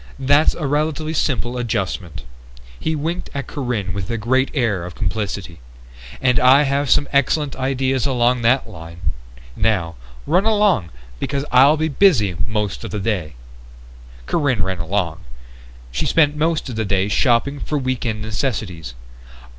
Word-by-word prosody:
That's 145 +3 +3
a 155 - -4
relatively 155 +2 -1
simple 125 -5 -1
adjustment." 95 -7 -3 0.6
He 160 - -1
winked 160 +4 -3
at 140 -2 -3
Corinne 120 -11 -3
with 95 -2 -5
a 115 - -1
great 130 +5 +1
air 110 - 0
of 90 0 -8
complicity. 100 -3 -3 0.6
"And 125 -1 +3
I 130 +3 +6
have 140 0 0
some 145 - +3
excellent 140 +1 +1
ideas 130 0 0
along 125 -1 +2
that 120 +4 +2
line. 80 0 -6 0.4
Now, 95 -7 0 0.3
run 185 +3 +2
along, 205 - +2 0.3
because 140 - -2
I'll 135 +5 +6
be 160 +1 0
busy 135 - +3
most 105 -2 -2
of - - -5
the 105 - -4
day." 95 - -2 0.9
Corinne 140 - +1
ran 95 -2 -2
along. 85 -1 -2 0.7
She 60 - -1
spent 150 -2 +3
most 160 +1 0
of 125 - -5
the 110 - 0
day 95 -1 +1
shopping 125 +5 +2
for 150 - -2
week 130 -2 -2
end 110 -3 -2
necessities. 105 - -3
125 Hz, 150 wpm, -20 LUFS, 100-145 Hz, 0.9 s, I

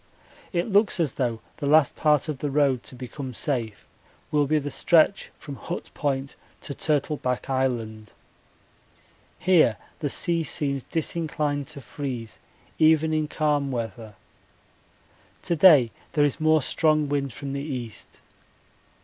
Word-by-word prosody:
It 175 -2 0
looks 205 -2 +2
as 160 -5 +1
though 120 -4 -2 0.2
the 145 - -3
last 155 0 +4
part 150 -1 +2
of 150 -4 -4
the 145 - -2
road 135 -3 +2
to - - -7
become 130 +1 -7
safe 115 -7 -2 0.5
will 145 -2 +2
be 155 +2 +2
the 145 -1 -3
stretch 165 +7 +3
from 140 -3 -9
Hut 175 - -6
Point 135 -2 -2 0.3
to 140 - -6
Turtleback 140 -4 -1
Island. 115 -5 -2 1.2
Here 170 - +4 0.2
the 145 - -1
sea 170 +3 0
seems 140 -4 -2
disinclined 150 -3 -2
to 150 -3 -7
freeze 125 -5 -6 0.4
even 160 0 +4
in 155 -1 0
calm 150 -2 0
weather. 115 -3 -5 1.3
To 170 - 0
day 150 -8 +7 0.2
there 145 -1 +4
is 145 - -1
more 155 -2 +3
strong 155 0 +2
wind 140 -1 -1
from 140 +3 -6
the 140 - -3
east. 125 -7 -7
145 Hz, 140 wpm, -25 LUFS, 130-155 Hz, 1.3 s, day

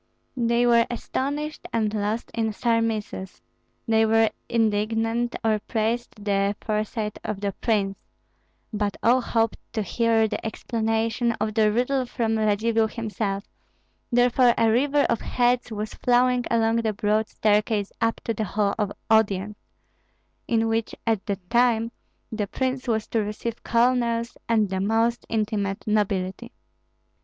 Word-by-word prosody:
They 235 -1 +2
were 235 -1 +4
astonished 285 +5 -3
and 220 -2 0
lost 215 +2 -2
in 220 -2 -1
surmises, 225 -4 -1 0.5
they 225 -1 +4
were 225 0 +3 0.2
indignant 225 +1 0
or 215 -1 +2
praised 220 -1 -2
the 200 0 +1
foresight 215 0 -2
of 210 -2 -3
the 200 0 -1
prince; 195 -2 -1 0.7
but 205 -1 -1
all 250 +3 +4
hoped 225 -2 0
to 220 - -1
hear 225 +3 +2
the - - -4
explanation 225 +1 -1
of 215 -1 -2
the 215 -1 +3
riddle 250 +3 0
from 225 -2 -1
Radzivill 220 +1 +2
himself, 215 -3 -3 0.7
therefore 245 0 +4
a 225 -1 +4
river 280 +5 +3
of 235 - 0
heads 245 0 +1
was 215 0 -4
flowing 250 0 +2
along 225 0 +2
the 225 -2 0
broad 210 +2 +1
staircase 210 -1 +1
up 230 0 0
to 230 - -1
the 220 - -2
hall 200 0 0
of 205 -2 0 0.2
audience, 210 -2 +2 0.9
in 225 -1 +2
which 225 0 -1
at 225 -4 +1
that 195 -3 -4
time 235 -1 +3 0.4
the 215 -2 -2
prince 260 +3 -2
was 220 -2 0
to 225 - +1
receive 215 +2 -4
colonels 235 -1 +1
and 215 -3 +3
the 190 - -1
most 225 +4 +1
intimate 205 -3 -1
nobility. 205 +1 -1
225 Hz, 140 wpm, -25 LUFS, 210-235 Hz, 0.9 s, were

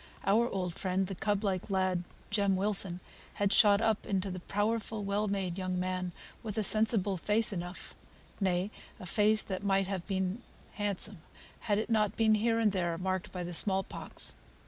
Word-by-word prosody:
Our 230 +5 +3
old 180 -3 -3
friend, 185 +1 -1
the 195 - -5
cub 205 +2 -1
like 190 -1 -1
lad, 185 -2 0 0.3
Jem 200 -2 +2
Wilson, 190 -2 +2 0.3
had 200 0 +1
shot 205 -1 +6
up 220 -2 0
into 195 -1 -1
the 185 - -5
powerful, 210 +3 -2
well 200 +2 0
made 195 -2 -2
young 185 -1 -2
man, 185 0 -2 0.3
with 220 -2 -5
a 215 - +1
sensible 215 -2 +4
face 210 +4 +2
enough; 175 0 -5 0.5
nay, 190 0 0 0.3
a - - -8
face 215 +3 +3
that 190 -2 -4
might 195 -1 +2
have 190 -2 -4
been 190 +3 -2 0.3
handsome, 205 -3 0 0.4
had 205 -2 0
it 220 +2 -2
not 215 -2 +1
been 220 -1 +4
here 225 +2 +2
and 220 -2 +3
there 175 -3 -1
marked 185 0 -2
by 180 -1 -4
the 175 0 -5
small 190 +2 +2
pox. - - -4
195 Hz, 180 wpm, -31 LUFS, 185-210 Hz, 0.5 s, shot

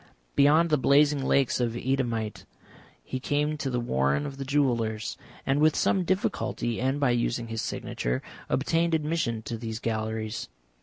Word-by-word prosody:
Beyond 155 +4 +5
the 150 - +4
blazing 145 +2 +4
lakes 135 -1 +2
of 120 -2 0
Eadhamite 120 -3 -2 0.6
he 130 - -4
came 150 +3 0
to 135 - -1
the 125 -1 -1
warren 70 - +1
of 135 - -6
the 135 - -4
jewellers, 120 -6 0 0.3
and, 135 +2 +2
with 155 0 +4
some 185 -2 +2
difficulty 170 - -1
and 135 +2 0
by 140 -4 +3
using 120 -1 -1
his 115 -1 -2
signature, 60 +1 -3 0.3
obtained 165 +4 +1
admission 150 -8 -1
to 115 -1 -5
these 110 -1 -4
galleries. 110 - -3
130 Hz, 155 wpm, -27 LUFS, 115-145 Hz, 0.6 s, Beyond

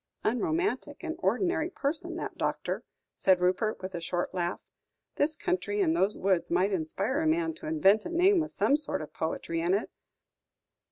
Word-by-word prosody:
"Unromantic 325 - -1
and - - -3
ordinary 345 -3 +1
person, 300 -3 -3
that - - -5
doctor," - - -2 0.3
said 185 -2 +4
Rupert, 185 +3 0
with 190 0 -5
a 170 - -4
short 175 +2 -2
laugh; 175 -1 -1 0.6
"this 300 +2 +2
country 375 +4 -1
and 330 -5 +3
those 205 - +2
woods 190 -3 +1
might 185 +4 +2
inspire 195 - -1
a 320 - +1
man 330 +1 +1
to 320 0 -9
invent 220 -10 +4
a - - -6
name 360 +3 +4
with 315 -1 -1
some 280 - +2
sort 300 - -3
of 150 - -11
poetry 165 +1 -2
in 175 +3 +2
it. 205 - -2
260 Hz, 175 wpm, -29 LUFS, -, 0.6 s, said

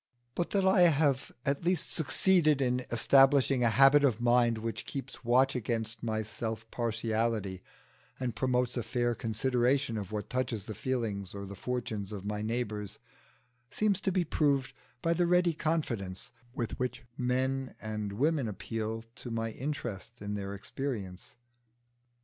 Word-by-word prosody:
But 175 - -1
that 195 -2 +1
I 190 -1 +5
have 145 -3 +1
at 140 +3 0
least 175 -1 +1
succeeded 160 -1 +3
in 125 -1 0
establishing 135 +2 +5
a 120 - +5
habit 135 +6 +6
of 125 -6 +3
mind 120 -1 +3
which 115 +1 -4
keeps 135 -1 -6
watch 130 +3 +3
against 115 -1 -2
my 110 -1 -1
self 110 +1 -5
partiality 110 -4 -1 0.6
and 125 -3 -2
promotes 125 -1 +1
a 120 - 0
fair 120 +1 0
consideration 120 +2 +1
of 100 -1 -7
what 105 -1 -3
touches 125 -5 -2
the 110 - -5
feelings 105 -5 -3
or 100 0 -5
the 100 - -8
fortunes 110 -2 -3
of 100 -2 -6
my 105 0 -2
neighbours, 110 -3 -3 0.7
seems 210 -3 +1
to 190 - +1
be 185 -1 +2
proved 140 -4 +1 0.3
by 165 - +3
the 175 +1 +2
ready 180 -1 +4
confidence 125 - -2 0.2
with 120 -3 -3
which 125 -1 -2
men 130 +1 -1
and 105 -2 -4
women 140 +3 +1
appeal 110 +3 -4
to 125 - -8
my 115 -1 -2
interest 120 -4 -5
in 105 0 -4
their 100 -1 -4
experience. 100 -4 -5
120 Hz, 150 wpm, -31 LUFS, 110-135 Hz, 0.7 s, habit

